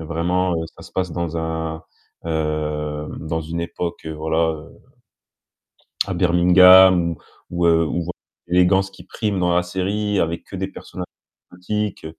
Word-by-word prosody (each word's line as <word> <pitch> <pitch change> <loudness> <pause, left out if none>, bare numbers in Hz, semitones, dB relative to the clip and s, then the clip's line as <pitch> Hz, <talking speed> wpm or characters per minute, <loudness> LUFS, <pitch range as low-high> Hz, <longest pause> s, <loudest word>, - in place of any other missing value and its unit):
heu, 80 - -6
vraiment, 90 +3 0
heu, 80 - -2
ça - - -12
se - - -14
passe 90 -1 -1
dans 85 -1 -3
un, 80 0 -3 0.4
heu, 75 -1 -2
dans 80 +1 -3
une 85 +2 -4
époque, 85 -1 -5
voilà, 80 +1 0
heu, 75 -1 -9 1.4
à 95 - -2
Birmingham 90 0 +6 0.4
ou 85 0 0
ou - - +5
heu, 85 0 +4
on 85 - -2
voit 85 - -4 0.4
l'élégance 90 +2 +3
qui 90 - -14
prime 105 -1 -2
dans 90 -1 +2
la 90 - +3
série 100 +3 -1
avec 85 0 -1
que - - -9
des - - -2
personnages - - -8 0.5
exotiques, 105 0 -3
85 Hz, 160 wpm, -21 LUFS, 80-90 Hz, 1.4 s, Birmingham